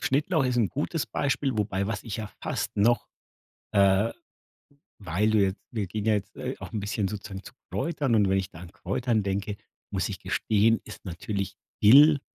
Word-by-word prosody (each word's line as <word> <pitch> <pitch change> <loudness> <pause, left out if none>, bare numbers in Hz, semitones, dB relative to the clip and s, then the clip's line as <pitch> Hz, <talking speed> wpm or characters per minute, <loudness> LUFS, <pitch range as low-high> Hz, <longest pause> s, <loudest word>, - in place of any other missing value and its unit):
Schnittlauch 145 +3 +1
ist 125 -1 +1
'n 110 - +3
gutes 155 +2 -2
Beispiel, 135 -3 -1
wobei 100 -2 0
was 105 -2 -3
ich 115 -1 -4
ja 110 - -3 0.2
fast - - -3
noch 120 +4 +3 0.7
äh, 100 +2 +4 0.9
weil 95 +5 +1
du 110 - +4
jetzt 95 +1 +1
wir 105 -5 -2
gehen 105 +3 -4
ja 110 - +4
jetzt, 105 -2 -2
äh, - - -4
auch - - -8
'n 110 - -2
bisschen 105 -1 -1
sozusagen 100 -2 -7
zu - - -12 0.2
Kräutern 135 -5 0
und 100 -3 +4
wenn 95 - +3
ich 95 - -2
da 80 - -12
an 90 0 -10
Kräutern 110 +3 -1
denke, 100 +1 -2 0.3
muss - - 0
ich - - -6
gestehen, 110 +1 +2
ist - - -10
natürlich 100 +2 -4 0.3
Dill 145 +6 +8
105 Hz, 190 wpm, -27 LUFS, 100-120 Hz, 0.9 s, Dill